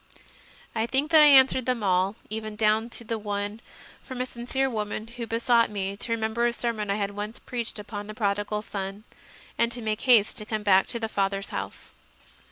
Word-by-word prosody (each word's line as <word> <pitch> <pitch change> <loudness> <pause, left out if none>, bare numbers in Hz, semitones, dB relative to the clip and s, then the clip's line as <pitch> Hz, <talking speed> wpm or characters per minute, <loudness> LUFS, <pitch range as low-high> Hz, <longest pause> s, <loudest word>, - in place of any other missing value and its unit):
I 225 0 -1
think 275 +5 0
that 315 -1 +8
I 300 - +9
answered 265 -2 +6
them 250 -3 0
all, 190 +1 +2 0.2
even 215 -1 -5
down 215 +1 +2
to 230 -1 -2
one 205 +1 -4 0.4
from 260 -2 -8
a 250 - 0
sincere 255 +2 -2
woman 215 -3 -3
who 235 0 -7
besought 230 0 +2
me 200 -1 -3
to 230 - -4
remember 230 +1 0
a 240 - -1
sermon 230 -4 -2
I 200 - +1
had 200 -1 -2
once 205 +2 -6
preached 235 -3 -4
upon 205 0 -7
the 215 - -8
Prodigal 205 0 -1
Son, 195 0 -6 0.6
and 235 0 +3
to 245 - -3
make 215 -1 -2
haste 235 -5 +4
to 210 - -6
come 215 -2 -2
back 195 -2 +4
to 235 - -4
the 225 - -2
Father 195 -2 0
s 195 - -7
house. - - -6
220 Hz, 200 wpm, -26 LUFS, 205-235 Hz, 0.6 s, I